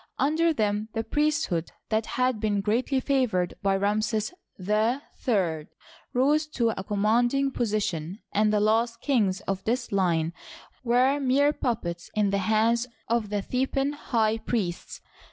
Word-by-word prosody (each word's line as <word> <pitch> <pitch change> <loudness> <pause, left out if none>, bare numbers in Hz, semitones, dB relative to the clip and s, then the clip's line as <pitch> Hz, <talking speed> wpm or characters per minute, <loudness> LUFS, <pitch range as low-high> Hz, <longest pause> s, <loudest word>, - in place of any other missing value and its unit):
Under 315 +5 +2
them 215 -5 -1
the 225 - -1
priesthood 295 - 0 0.2
that 220 0 0
had 255 -3 +1
been 210 -2 0
greatly 240 +6 +1
favored 250 -10 +1
by 195 -1 +2
Ramses 215 - 0 0.3
III 210 - 0 0.4
rose 295 +5 +2
to 230 -2 +2
a 190 - -5
commanding 240 +7 +1
position, 200 -8 -2
and 210 +1 +2
the 210 - +2
last 230 +2 +1
kings 215 -10 +1
of 195 -1 -3
this 240 +2 -1
line 170 -4 +1 0.5
were 255 +4 +3
mere 280 +2 +3
puppets 175 - -3
in 210 -2 +2
the 200 - +1
hands 225 +4 +2 0.2
of 230 -3 0
the 205 -1 -2
Theban 270 +4 0
high 225 -6 0
priests. 195 -8 -3
220 Hz, 135 wpm, -26 LUFS, 200-255 Hz, 0.5 s, were